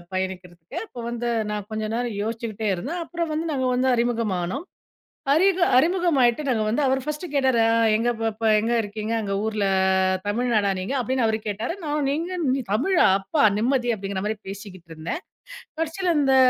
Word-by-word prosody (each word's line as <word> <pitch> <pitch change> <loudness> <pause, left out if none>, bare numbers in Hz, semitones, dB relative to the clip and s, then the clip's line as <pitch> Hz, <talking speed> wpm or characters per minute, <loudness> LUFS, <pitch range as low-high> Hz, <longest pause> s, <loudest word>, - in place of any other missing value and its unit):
பயணிக்கிறதுக்கு. 185 - -5
அப்போ 245 - -11
வந்து 240 0 -2 0.2
நான் 210 -1 -4
கொஞ்ச 215 0 -2
நேரம் 240 -4 -2
யோசிச்சுக்கிட்டே 220 -1 -3
இருந்தேன். 330 - -4
அப்புறம் 335 -2 -3
வந்து 325 +2 -2
நாங்க 260 -2 0
வந்து 260 +1 +2
அறிமுகம்னோம். 230 - -1 0.7
அறிக 375 +3 +3 0.2
அறிமுகமாகிட்டு 305 -5 +3
நாங்க 225 -4 +1
வந்து 235 +7 +1
அவர் 265 +1 +2
ஃபர்ஸ்ட்டு 300 +4 -4
கேட்டாரு 260 -4 +3 0.3
"எங்க 235 +2 +1
பாப்பா? 225 0 -1
எங்க 225 +3 +1
இருக்கீங்க? 215 +2 -4
அங்க 200 -2 -2
ஊரில 215 -2 0 0.6
தமிழ்நாடா 215 -2 +1
நீங்க?" 195 +9 -3
அப்படீன்னு 250 0 0
அவர் 220 0 +1
கேட்டாரு. 215 +9 -2
நான் 295 -1 -1
"நீங்க 340 +5 -2 0.4
தமிழா? 335 - +3
அப்பா 220 +8 0
நிம்மதி!" 245 +2 +1
அப்படிங்கிற 195 -1 -4
மாதிரி 215 0 -1
பேசிக்கிட்டு 195 -4 -9
இருந்தேன். 160 - -5 0.6
கடைசியில 340 +2 0
இந்த 270 -2 +3
235 Hz, 155 wpm, -24 LUFS, 210-290 Hz, 0.7 s, அறிக